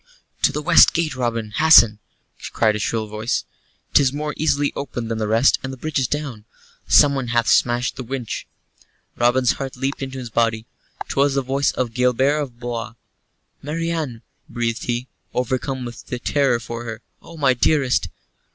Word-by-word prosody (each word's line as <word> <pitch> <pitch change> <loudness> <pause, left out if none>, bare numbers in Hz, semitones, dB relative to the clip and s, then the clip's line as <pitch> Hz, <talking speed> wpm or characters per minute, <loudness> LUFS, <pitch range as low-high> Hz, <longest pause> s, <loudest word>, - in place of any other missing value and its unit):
"To - - +4
the 150 +2 -4
west 175 - +6
gate, 160 -4 0
Robin, 115 -4 -2
hasten," 115 -5 +6 0.5
cried 110 -2 +2
a - - -3
shrill 110 +1 -1
voice. 110 +2 -2 0.5
"'Tis 135 -3 +5
more 150 +1 -3
easily 145 -2 +1
opened 120 -5 -5
than 110 - -2
the 110 - -1
rest, 115 +5 +3
and 130 - -5
the 135 - -8
bridge 155 +2 -2
is 130 - 0
down 135 -8 -4 0.4
someone 140 -3 +4
hath 120 -1 +1
smashed 120 +2 +2
the 130 - -5
winch." 125 -1 -5 0.7
Robin's 120 +1 +3
heart 135 -2 -5
leaped 135 +2 -3
in 135 - -3
his 130 -3 -7
body 115 0 0 0.4
'twas 140 0 +1
the 135 - +1
voice 135 +2 +1
of 120 -3 -2
Gilbert 125 +4 +2
of 125 -5 -7
Blois! 120 -1 -5 0.7
"Marian," 155 -5 -3 0.3
breathed 115 -1 -2
he, 120 +1 -2 0.3
overcome 130 +1 -2
with 120 -1 -8 0.2
terror 135 -5 +2
for 115 0 -6
her, 110 -1 -7 0.2
"oh, 165 - -13
my 140 -4 +3
dearest!" 130 +1 +1
125 Hz, 165 wpm, -21 LUFS, 115-140 Hz, 0.7 s, west